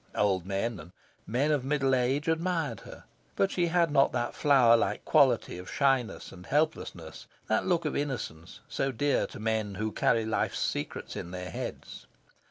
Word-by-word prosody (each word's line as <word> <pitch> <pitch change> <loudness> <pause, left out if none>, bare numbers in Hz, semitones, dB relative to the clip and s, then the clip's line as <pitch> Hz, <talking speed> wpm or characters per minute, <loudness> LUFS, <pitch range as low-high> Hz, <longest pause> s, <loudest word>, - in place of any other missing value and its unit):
Old 95 -3 +1
men 100 +2 -2
and 85 +3 -12 0.3
men 135 +7 +1
of 145 -4 +1
middle 135 -1 +1
age 130 +4 +1
admired 160 - 0
her, - - -12 0.3
but 195 - +2
she 175 -1 +1
had 170 -2 +2
not 135 -1 +4
that 120 - -1
flower 130 -5 +5
like 115 - -1
quality - - +3
of 90 - -9
shyness 135 -4 0
and 90 0 -12
helplessness, 145 - -2 0.2
that 110 - 0
look 170 -3 +1
of 150 - -1
innocence, 120 - -4
so 135 - -1
dear 145 +4 +1
to - - -10
men 110 -2 -1
who 110 +2 -2
carry 115 +1 +2
life's 110 - -1
secrets - - -3
in 85 - -5
their 90 -1 -6
heads. - - -7
125 Hz, 175 wpm, -29 LUFS, 105-150 Hz, 0.3 s, flower